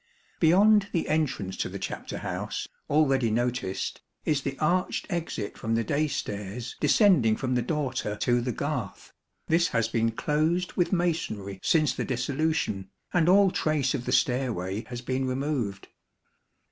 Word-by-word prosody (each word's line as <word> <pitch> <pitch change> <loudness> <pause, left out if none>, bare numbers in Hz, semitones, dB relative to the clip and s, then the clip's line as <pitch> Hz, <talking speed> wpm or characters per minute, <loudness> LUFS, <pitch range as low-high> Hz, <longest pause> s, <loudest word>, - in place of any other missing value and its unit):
Beyond 200 +5 +5
the 165 - 0
entrance 135 -12 -1
to - - -2
the - - -6
chapter - - -5
house, - - -4 0.2
already 135 -5 +3
noticed, 120 -4 -2 0.2
is 150 -2 +1
the 135 -1 -4
arched 180 +4 0
exit 165 - -3
from 115 +1 -1
the 115 - +1
day 145 +7 +1
stairs 105 -2 -4
descending 150 - +4
from 130 +2 -2
the 125 - +2
dorter 130 -5 -2
to 120 +3 +1
the 125 +1 -1
garth; - - -4 0.3
this 170 +2 +3
has 115 -6 +1
been 115 0 +1
closed 155 +9 0
with 175 - +1
masonry 135 - -1
since 155 -3 +3
the - - -3
Dissolution, 130 -6 -1 0.2
and 175 -1 +3
all 195 0 +6
trace 150 -6 +1
of 125 - -3
the - - -2
stairway 115 -5 0
has 120 +1 -6
been 130 +1 -1
removed. 130 -6 -2
130 Hz, 150 wpm, -27 LUFS, 115-160 Hz, 0.3 s, all